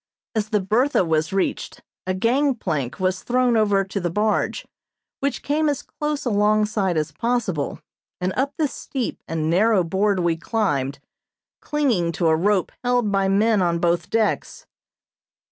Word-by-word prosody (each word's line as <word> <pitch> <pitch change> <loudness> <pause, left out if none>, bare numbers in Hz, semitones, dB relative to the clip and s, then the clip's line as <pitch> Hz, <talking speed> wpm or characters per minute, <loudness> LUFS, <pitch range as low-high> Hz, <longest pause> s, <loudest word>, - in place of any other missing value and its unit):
As 215 -2 -1
the 215 -2 +2
"Bertha" 215 +4 +2
was 160 +1 0
reached, 195 -1 -2 0.2
a 185 - 0
gangplank 210 - 0
was 185 0 0
thrown 250 -1 +2
over 205 -3 +3
to 195 +1 -4
the 175 -2 -1
barge, 210 +5 0 0.5
which 280 -2 -2
came 300 +1 +1
as 285 - -2
close 300 -1 -4
alongside 210 -4 +2
as 155 0 -1
possible, 195 -6 -1 0.4
and 185 +1 -1
up 275 +2 -1
this 300 -3 0
steep 260 -4 -4
and 160 -1 -2
narrow 195 +3 +3
board 195 +3 +1
we 170 -1 +1
climbed, 145 - -1 0.6
clinging 245 - 0
to 165 -1 +1
a 160 - +4
rope 190 +2 +1
held 245 -4 +1
by 195 -1 +2
men 205 +2 +3
on 170 -1 +1
both 170 0 0
decks. 225 -1 -1
205 Hz, 150 wpm, -22 LUFS, 175-235 Hz, 0.6 s, a